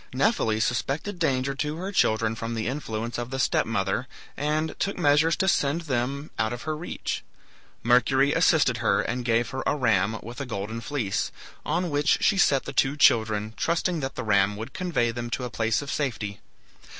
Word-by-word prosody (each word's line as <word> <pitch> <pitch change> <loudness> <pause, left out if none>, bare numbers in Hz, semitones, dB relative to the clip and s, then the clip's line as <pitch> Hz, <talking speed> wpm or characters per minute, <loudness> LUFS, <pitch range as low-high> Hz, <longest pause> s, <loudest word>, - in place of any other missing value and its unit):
Nephele 130 - +2
suspected 140 - -1
danger 135 -4 +1
to 150 +2 -2
her 185 +4 -4
children 110 - +2
from 115 +1 -4
the 110 -1 -2
influence 115 -3 -3
of 120 0 -4
the 135 - -4
step 130 - +1
mother, 100 +2 -1 0.3
and 155 +2 -1
took 200 - -1
measures 150 +3 +4
to 190 - 0
send 150 -2 +2
them 140 0 -2
out 110 0 +1
of 120 0 -5
her 155 0 -2
reach. 160 +3 -4 0.6
Mercury 130 +3 +4
assisted - - +3
her, - - +2
and 125 +1 -3
gave 115 0 +1
her 130 - -3
a - - +2
ram 110 -5 +2
with 120 +5 -7
a - - -3
GOLDEN 110 +1 -4
FLEECE, 115 -8 -2 0.3
on 170 +2 -1
which 145 +2 +3
she 200 - +2
set 140 -7 +3
the - - -6
two 135 +2 +2
children, 110 -5 +3
trusting 170 +1 0
that 135 -2 -4
the 125 - -4
ram 100 -1 +3
would 110 +5 -7
convey 170 -11 0
them 120 0 -5
to 125 - -3
a 125 - -4
place 115 +4 0
of 140 - -5
safety. 110 -8 -3
130 Hz, 190 wpm, -26 LUFS, 115-150 Hz, 0.6 s, measures